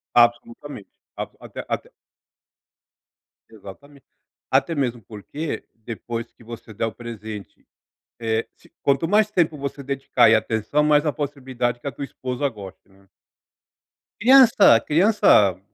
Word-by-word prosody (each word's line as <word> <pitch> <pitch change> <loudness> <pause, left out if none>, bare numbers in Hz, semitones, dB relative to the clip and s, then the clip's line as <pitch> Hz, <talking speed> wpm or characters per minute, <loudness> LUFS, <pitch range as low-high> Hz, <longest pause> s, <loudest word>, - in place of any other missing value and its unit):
Absolutamente 120 0 +1 0.3
abso - - -7
até - - -9
até - - -4 1.6
Exatamente. 125 +7 -14 0.4
Até 135 +5 +1
mesmo 125 -5 -2
porque 115 +10 -6
depois 115 +1 -7
que 115 - -20
você 115 -1 -10
der 115 - -2
o 110 - -4
presente, 110 -3 -9 0.6
eh, 115 0 -1
se - - -24
quanto 140 +4 +1
mais 210 +2 +3
tempo 165 -6 +1
você 140 0 -6
dedicar 135 -3 +2
e - - +6
atenção, 110 +6 0
mais 150 0 +3
a 150 - +1
possibilidade 130 -4 -3
que - - -12
a 140 - -2
tua 140 - -6
esposa 130 +1 -3
goste, 100 -5 -12
né. 95 0 -25 1.1
Criança 230 - +7
criança 150 - +4
125 Hz, 130 wpm, -22 LUFS, 110-145 Hz, 1.6 s, Criança